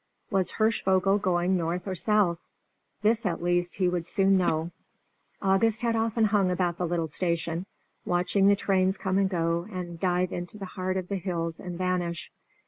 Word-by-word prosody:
Was 190 -3 +1
Hirschvogel 195 -3 +2
going 185 -1 +1
north 175 +2 -2
or 190 - -2
south? 190 -3 +2 0.6
This 225 +2 +3
at 175 -4 -2
least 175 0 0
he 185 -2 +1
would 175 -2 -1
soon 195 0 +3
know. 170 -2 +1 0.7
August 210 +4 +2
had 230 -1 +1
often 225 0 +1
hung 200 -3 +2
about 180 -1 -1
the 180 - 0
little 165 -1 -1
station, 170 +2 -2 0.4
watching 180 +2 +2
the 200 - +6
trains 190 -1 +1
come 190 0 0
and 195 -1 +2
go 170 -1 -1
and 175 -3 -6
dive 180 0 0
into 175 +4 -5
the 200 - -6
heart 185 0 -3
of 185 -1 -3
the 200 - -2
hills 170 -3 -3
and 180 -2 -6
vanish. 180 -2 -2
185 Hz, 175 wpm, -27 LUFS, 175-195 Hz, 0.7 s, the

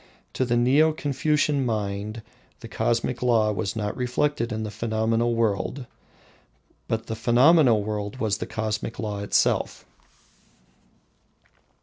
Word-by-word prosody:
To 130 - 0
the 120 -1 +1
Neo 140 +6 +4
Confucian 145 0 0
mind 105 -1 -3 0.4
the - - -8
cosmic 120 +1 -1
law 115 -4 +3
was 100 0 -3
not 105 -2 -3
reflected 125 0 -1
in 110 0 -3
the 105 - -5
phenomenal 115 +2 0
world, 115 +4 -1 1.0
but 110 0 -2
the 110 - -4
phenomenal 120 0 +4
world 105 0 -4
was 110 -4 -1
the - - -4
cosmic 110 0 -3
law 105 -3 -4
itself. 100 - 0
115 Hz, 120 wpm, -25 LUFS, 105-125 Hz, 1.0 s, Neo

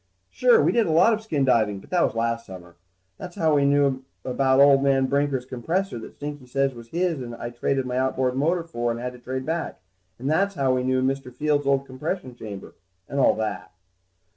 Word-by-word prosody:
Sure, 480 -2 +4
we - - +3
did 230 -4 +2
a - - 0
lot 170 +8 +5
of 220 - -2
skin 155 -11 0
diving, 110 -5 +2
but - - -18
that 180 - +2
was - - 0
last 115 0 -1
summer. 90 -2 -11 0.4
That's 180 -1 -8
how 160 -2 +2
we 140 -1 +3
knew 140 -2 +2 0.2
about 130 +1 +2
old 140 -1 +6
man 135 -1 +3
Brinker's 140 -1 0
compressor 150 +4 -2
that 110 - -11
Stinky 145 -3 -7
said 135 +1 0
was 115 -1 -11
his 170 0 -1
and 120 -1 -6
I 120 +1 -6
traded 130 +2 -1
my 125 0 -3
outboard 130 -1 0
motor 165 +6 +1
for 120 -8 -3
and 115 0 -2
had 125 +1 -4
to 125 - -13
trade 130 +1 -5
back. 165 +2 -3 0.4
And 130 - -5
that's 195 +6 +1
how 135 -2 +1
we 130 - +1
knew 130 0 +1
about 135 +1 +1
Mr. 130 -2 -13
Fields' 145 +2 0
old 140 0 +2
compression 135 +2 -5
chamber, 105 -5 -9 0.3
and 140 - -3
all - - +4
like 110 0 -1
that. - - -21
135 Hz, 225 wpm, -24 LUFS, 125-150 Hz, 0.4 s, old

